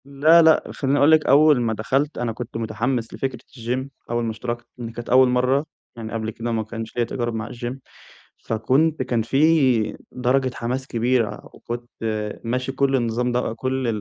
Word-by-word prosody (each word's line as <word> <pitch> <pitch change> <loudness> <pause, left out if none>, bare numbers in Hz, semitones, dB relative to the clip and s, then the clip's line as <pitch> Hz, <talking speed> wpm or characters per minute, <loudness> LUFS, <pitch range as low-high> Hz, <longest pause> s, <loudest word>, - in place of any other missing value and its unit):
لأ 150 +5 +5
لأ 160 -1 +5
خلّيني 140 0 0
أقول 145 +3 +5
لِك، 155 -1 +5
أول 145 -2 +5
ما 115 -2 0
دخلت 135 +7 -1
أنا 120 -1 -1
كنت 115 0 -6
متحمس 115 +2 -2
لفكرة 135 -2 -3 0.2
الجيم، 125 +3 -3 0.2
أول 120 0 0
ما 115 - -1
اشتركت 120 +1 -5
لإن 120 -2 -6
كانت 120 +1 -8
أول 130 +1 +6
مرّة 125 +4 +2 0.3
يعني 115 -1 -7
قبل 110 -1 -2
كده 115 +2 -4
ما 110 -1 0
كانش 115 +1 -7
ليَّ 120 - +2
تجارُب 120 0 -3
مع 110 0 -4
الجيم، 120 +2 -6 0.7
فكنت 130 +8 +1
كان 120 -2 0
في 135 -2 +3 0.2
درجة 130 +1 +1
حماس 130 +3 -3
كبيرة، 120 -1 0
وكنت 120 0 -7 0.5
ماشي 125 +3 -2
كل 135 0 +1
النظام 120 0 0
ده 120 -2 -1
كل 130 +2 -2
125 Hz, 175 wpm, -22 LUFS, 115-135 Hz, 0.7 s, أول